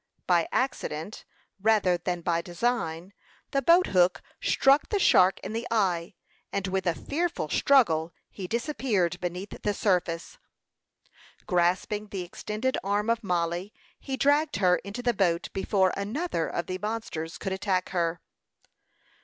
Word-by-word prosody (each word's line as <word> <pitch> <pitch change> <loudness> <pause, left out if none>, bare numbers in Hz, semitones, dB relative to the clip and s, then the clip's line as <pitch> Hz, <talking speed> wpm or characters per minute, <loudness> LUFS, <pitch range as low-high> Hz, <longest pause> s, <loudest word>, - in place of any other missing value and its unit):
By 175 -2 +3
accident, 205 - -2 0.4
rather 205 -4 +3
than 175 0 -3
by 170 0 0
design, 175 -2 -2 0.4
the 275 - +1
boat 340 +6 +5
hook 180 -1 +2 0.2
struck 275 +2 +3
the 415 - +1
shark 190 - +5
in - - -6
the 230 +2 -3
eye; 190 -5 0 0.4
and 200 -1 -2
with 190 0 -1
a 170 - +2
fearful 335 - -2
struggle 170 - +3 0.2
he 190 -3 -6
disappeared 225 - 0
beneath 180 +2 -5
the 205 -1 -1
surface. 180 - -1 1.1
Grasping 185 +3 +1
the 195 -3 -4
extended 215 +8 -3
arm 205 +3 +1
of 230 -1 -1
Mollie, 175 +1 -2 0.2
he 270 -1 -4
dragged 290 +3 +2
her 180 -2 +3
into 200 +6 -7
the 240 -1 +2
boat 175 -4 +1
before 190 -1 +1
another 210 - -2
of 170 - -3
the 185 +1 -4
monsters 210 -7 -4
could 190 - -3
attack 190 -1 -1
her. 170 -2 -1
195 Hz, 140 wpm, -27 LUFS, 175-230 Hz, 1.1 s, boat